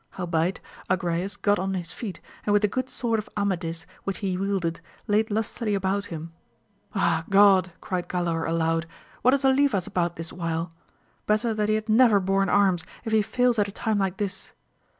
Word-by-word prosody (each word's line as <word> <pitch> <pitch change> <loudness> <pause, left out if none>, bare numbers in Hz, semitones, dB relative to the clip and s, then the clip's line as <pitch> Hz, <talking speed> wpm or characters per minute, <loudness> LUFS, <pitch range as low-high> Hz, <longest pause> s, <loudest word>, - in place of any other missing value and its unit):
Howbeit, 175 0 0 0.3
Agrayes 185 +2 -1
got 205 -1 +2
on 190 +1 -1
his 175 -2 -4
feet, 195 -8 -6 0.2
and 205 - +1
with 205 0 +3
the - - +5
good 255 +5 -3
sword 230 -3 0
of 215 - -7
Amadis, 175 -5 -2 0.2
which 195 - -3
he 190 -3 -2
wielded, 180 -4 -1 0.2
laid 215 +1 +2
lustily 215 0 -1
about 195 +1 0
him. 165 0 -7 0.6
Ah, 170 -4 +2
God, 195 -2 +5
cried 180 -2 -3
Galaor 170 -2 -1
aloud, 165 0 0 0.3
what 255 +2 +5
is 275 0 -1
Olivas 265 -8 +3
about 175 -1 -1
this 165 0 -5
while! 165 -1 -3 0.5
better 215 +2 +2
that 210 -1 0
he 215 - +3
had 215 +1 -3
never 220 -2 +5
borne 195 +1 +1
arms, 190 -4 +3 0.2
if 225 - -3
he 220 -1 +4
fails 245 +2 +1
at 205 - +3
a - - -7
time 215 +1 -1
like 190 -1 -1
this 200 -2 -4
195 Hz, 185 wpm, -26 LUFS, 175-215 Hz, 0.6 s, the